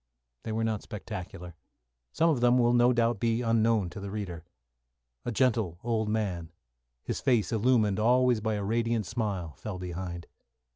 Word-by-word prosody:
They - - -5
were 110 +1 -1
not 110 -2 -1
spectacular. 90 -5 -7 0.6
Some 165 +2 +3
of 130 -6 0
them 120 +1 +5
will 120 -1 +4
no 120 +1 +5
doubt 115 -3 +1
be 115 +2 +1
unknown 115 -4 +2
to - - -8
the 100 0 -6
reader. 95 -5 -5 0.8
A 120 - -1
gentle 110 -8 +1
old 110 -2 0
man, 95 -7 -2 0.5
his - - -3
face 120 -6 +2
illumined 110 -3 +2
always 125 +1 +4
by 110 0 0
a 105 - -3
radiant 115 +1 0
smile, 95 -8 -3
fell 105 -4 -6
behind. 90 -1 -5
110 Hz, 160 wpm, -29 LUFS, 100-120 Hz, 0.8 s, them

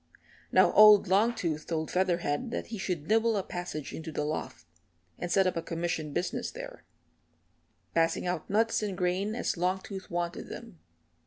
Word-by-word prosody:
Now - - +5
old 210 -1 +8
Longtooth 190 -6 +1
told 160 -2 -2
Featherhead 180 - 0
that - - -3
he 220 - -4
should 175 -6 -3
nibble 225 0 +3
a 195 - -1
passage 175 -6 -6
into 160 0 -6
the 150 - -2
loft, 155 +1 -4 0.5
and 175 - -4
set 195 +1 +4
up 185 - +1
a 165 - -1
commission 165 -2 -3
business 175 - -2
there - - -9 1.1
passing 165 +1 +1
out 175 -2 -3
nuts 225 +3 +2
and 200 -4 -3
grain 185 +4 0
as - - -1
Longtooth 190 +2 -2
wanted 175 0 -3
them. 85 - -9
180 Hz, 160 wpm, -29 LUFS, 165-205 Hz, 1.1 s, old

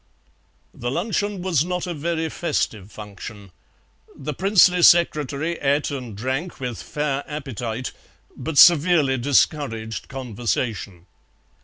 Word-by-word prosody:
The 120 - -4
luncheon 200 - -2
was 170 -6 +2
not 180 +1 -3
a 175 - -4
very 160 +1 -2
festive 110 - -2
function. 105 -1 -10 0.6
The 150 +2 -5
princely 185 +1 +4
secretary 160 -2 +3
ate 145 +1 +1
and 125 -7 -6
drank 135 - -3
with 125 -3 -4
fair 145 -2 -2
appetite, 130 -5 -5 0.4
but 160 -2 -5
severely 155 -5 +6
discouraged 120 -4 0
conversation. 115 -7 -3
140 Hz, 110 wpm, -22 LUFS, 120-170 Hz, 0.6 s, severely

